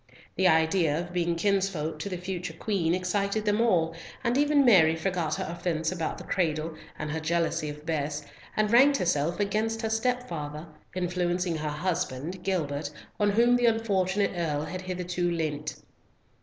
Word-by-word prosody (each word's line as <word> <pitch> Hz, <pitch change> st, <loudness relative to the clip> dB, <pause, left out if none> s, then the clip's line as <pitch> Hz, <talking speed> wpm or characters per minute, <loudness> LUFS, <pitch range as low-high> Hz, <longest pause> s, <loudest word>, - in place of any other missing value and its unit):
The 190 Hz, -, +3 dB
idea 160 Hz, -1 st, +3 dB
of 175 Hz, 0 st, -6 dB
being 170 Hz, -1 st, +1 dB
kinsfolk 180 Hz, -5 st, 0 dB
to 180 Hz, -, -4 dB
the 180 Hz, -, -3 dB
future 180 Hz, -2 st, -5 dB
Queen 175 Hz, -3 st, 0 dB
excited 200 Hz, +3 st, -1 dB
them 210 Hz, +1 st, +2 dB
all, 170 Hz, -8 st, +2 dB, 0.3 s
and 235 Hz, 0 st, +1 dB
even 290 Hz, 0 st, +4 dB
Mary 170 Hz, -9 st, +6 dB
forgot 165 Hz, -2 st, -1 dB
her -, -, -3 dB
offence 165 Hz, -1 st, -1 dB
about 165 Hz, -3 st, -3 dB
the -, -, -8 dB
cradle, 160 Hz, -3 st, -1 dB, 0.2 s
and 150 Hz, 0 st, -4 dB
her 160 Hz, -, -2 dB
jealousy 165 Hz, -1 st, 0 dB
of 150 Hz, +1 st, -9 dB
Bess, 150 Hz, -2 st, -2 dB, 0.3 s
and 215 Hz, 0 st, +2 dB
ranked 275 Hz, +4 st, +6 dB
herself 170 Hz, -1 st, 0 dB
against 220 Hz, +3 st, 0 dB
her 220 Hz, -, -1 dB
stepfather, 200 Hz, -11 st, -2 dB, 0.3 s
influencing 180 Hz, -1 st, 0 dB
her 155 Hz, 0 st, -2 dB
husband, 165 Hz, 0 st, -3 dB
Gilbert, 155 Hz, -7 st, -1 dB, 0.3 s
on 205 Hz, -1 st, +3 dB
whom 235 Hz, +4 st, +4 dB
the 245 Hz, -1 st, +3 dB
unfortunate 205 Hz, -3 st, +1 dB
Earl 155 Hz, -4 st, -1 dB
had 185 Hz, 0 st, -5 dB
hitherto 180 Hz, -1 st, -2 dB
leant. 155 Hz, -3 st, -2 dB
175 Hz, 160 wpm, -28 LUFS, 160-200 Hz, 0.3 s, Mary